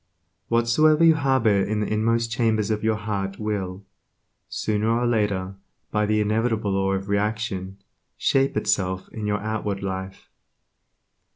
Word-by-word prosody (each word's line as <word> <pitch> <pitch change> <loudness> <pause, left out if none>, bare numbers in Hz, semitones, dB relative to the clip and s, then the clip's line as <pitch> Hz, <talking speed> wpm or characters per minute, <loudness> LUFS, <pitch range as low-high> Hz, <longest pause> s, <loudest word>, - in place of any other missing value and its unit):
Whatsoever 135 +8 +3
you 165 - +7
harbor 130 -9 +2
in 105 +1 -1
the 105 - -1
inmost 115 +1 +1
chambers 110 -3 +1
of 105 0 -1
your 110 0 +2
heart 100 -2 -3
will, 100 -3 -4 0.6
sooner 110 +1 -1
or 120 +2 +1
later 100 -5 0 0.3
by 105 -1 +1
the 110 0 +2
inevitable 110 0 0
law 95 0 +1
of 95 0 -3
reaction, 100 -2 -2 0.4
shape 135 -3 +2
itself 95 -3 0
in 110 -2 -5
your 105 0 0
outward 105 -2 -3
life. 95 0 -5
105 Hz, 135 wpm, -24 LUFS, 100-115 Hz, 0.6 s, you